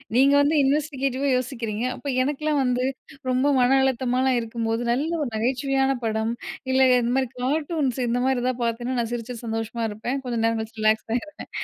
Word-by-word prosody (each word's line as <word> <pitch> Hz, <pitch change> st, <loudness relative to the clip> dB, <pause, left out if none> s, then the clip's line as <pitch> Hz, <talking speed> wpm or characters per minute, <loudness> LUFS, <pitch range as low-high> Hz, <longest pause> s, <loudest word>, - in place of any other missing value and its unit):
நீங்க 275 Hz, +3 st, +5 dB
வந்து 290 Hz, +2 st, +2 dB
இன்வெஸ்டிகேட்டிவா 275 Hz, -1 st, 0 dB
யோசிக்கிறீங்க. 235 Hz, -4 st, -3 dB
அப்ப -, -, -9 dB
எனக்கெலாம் 295 Hz, +2 st, 0 dB
வந்து 250 Hz, 0 st, +1 dB, 0.5 s
ரொம்ப 255 Hz, +2 st, +2 dB
மன 250 Hz, +2 st, +4 dB
அழுத்தமாகலாம் 260 Hz, 0 st, +1 dB
இருக்கும்போது 230 Hz, 0 st, -2 dB
நல்ல 280 Hz, +7 st, 0 dB
ஒரு 285 Hz, -, -1 dB
நகைச்சுவையான 270 Hz, +4 st, +1 dB
படம் 220 Hz, 0 st, 0 dB, 0.4 s
இல்ல, 260 Hz, -, +3 dB, 0.2 s
இந்த 235 Hz, 0 st, 0 dB
மாதிரி 260 Hz, -2 st, 0 dB
கார்ட்டூன்ஸ் 290 Hz, -1 st, 0 dB
இந்த 240 Hz, +1 st, 0 dB
மாதிரி 265 Hz, -2 st, +1 dB
ஏதாவது 255 Hz, -1 st, -1 dB
பாத்தேன்னா 240 Hz, +2 st, -1 dB
நான் 235 Hz, -1 st, -2 dB
சிரிச்சுட்டு 240 Hz, 0 st, -5 dB
சந்தோஷமா 225 Hz, +1 st, -3 dB
இருப்பேன். 225 Hz, +6 st, -3 dB
கொஞ்சம் 235 Hz, -2 st, -1 dB
நேரம் 225 Hz, 0 st, +1 dB
கழிச்சு 220 Hz, 0 st, -9 dB
ரிலாக்ஸ் 215 Hz, 0 st, +2 dB
ஆகிடுவேன். 295 Hz, +6 st, -5 dB
250 Hz, 165 wpm, -24 LUFS, 230-270 Hz, 0.5 s, நீங்க